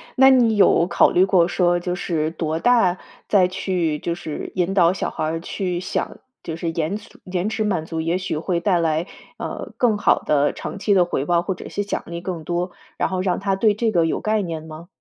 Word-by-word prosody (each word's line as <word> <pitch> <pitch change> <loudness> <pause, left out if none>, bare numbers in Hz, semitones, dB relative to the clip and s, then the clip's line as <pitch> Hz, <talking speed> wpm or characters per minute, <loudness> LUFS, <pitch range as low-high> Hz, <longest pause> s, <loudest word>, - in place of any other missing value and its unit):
那 265 +1 +7
你 240 -4 +4
有 180 -3 +4
考 - - +4
虑 185 - +4
过 185 -3 +4
说 175 -1 +2
就 180 0 -3
是 160 -4 -1
多 160 -1 -2
大 210 -5 +3 0.3
再 195 -3 +4
去 180 -5 -1
就 170 - -2
是 155 -3 -6
引 185 +1 0
导 175 -2 +4
小 - - -2
孩 - - -3
儿 160 +1 -2
去 180 -1 -3
想， - - -3 0.2
就 160 - -5
是 165 0 -3
延 165 +3 -2
迟 210 - -11
延 185 +2 -2
迟 220 0 -1
满 185 -6 -1
足， 165 -1 -4
也 165 +3 0
许 185 -4 -3
会 170 +1 -1
带 180 -2 +2
来， 160 0 0 0.3
呃， - - -6
更 230 -5 +2
好 - - +3
的 145 -1 +1
长 195 - -6
期 205 0 +2
的 185 - +5
回 160 -5 -2
报， 170 +1 +2
或 190 - -2
者 180 - -9
是 205 - -3
奖 205 - -3
励 170 0 -6
更 175 -3 -5
多， 175 +1 -2 0.2
然 - - 0
后 185 -1 -2
让 185 -1 0
他 195 -1 +1
对 210 +1 +3
这 220 +1 0
个 170 -4 +3
有 160 - -1
概 215 0 +1
念 165 -4 -4
吗？ 160 +2 -10
180 Hz, 250 characters per minute, -22 LUFS, 165-195 Hz, 0.3 s, 那